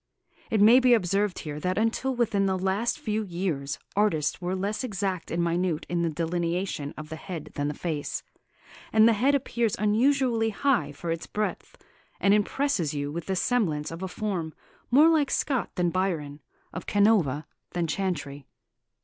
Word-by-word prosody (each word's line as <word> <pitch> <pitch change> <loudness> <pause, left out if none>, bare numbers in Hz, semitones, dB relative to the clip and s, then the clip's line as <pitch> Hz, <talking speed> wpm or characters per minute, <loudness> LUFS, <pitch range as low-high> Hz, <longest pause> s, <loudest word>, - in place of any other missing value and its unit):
It 220 -2 +2
may 230 +5 +8
be 250 -2 +6
observed 200 -1 0
here 150 -1 -5
that 180 +4 -1
until 230 +4 0
within 205 -5 +1
the 190 -1 +1
last 195 +5 0
few 215 0 -2
years 170 -7 -3 0.2
artists 175 -7 +1
were 180 +1 -1
less 205 +4 -2
exact 195 -6 -3
and 170 +1 0
minute 170 -1 0
in 175 -1 0
the 170 - +1
delineation 170 -1 -2
of 155 0 -8
the 160 - -5
head 160 -2 -7
than 145 0 -2
the 150 - -3
face; 155 -4 -3 0.7
and 220 0 +6
the 230 - +5
head 265 +7 +3
appears 235 -5 0
unusually 230 +2 +2
high 225 - +1
for 165 +4 -5
its 165 0 -4
breadth, 210 0 -4 0.4
and 200 - +4
impresses 210 - +1
you 145 0 -2
with 170 +2 -5
the 190 - 0
semblance 175 -10 0
of 165 +2 -7
a 190 - -2
form 180 -5 -3 0.3
more 290 +6 +6
like 315 -4 +3
Scott 265 -4 0
than 175 -1 +1
Byron, 160 -6 -2 0.3
of 180 - -6
Canova 200 -9 +3 0.3
than 175 -1 0
Chantrey. 145 -7 -3
190 Hz, 170 wpm, -27 LUFS, 165-220 Hz, 0.7 s, may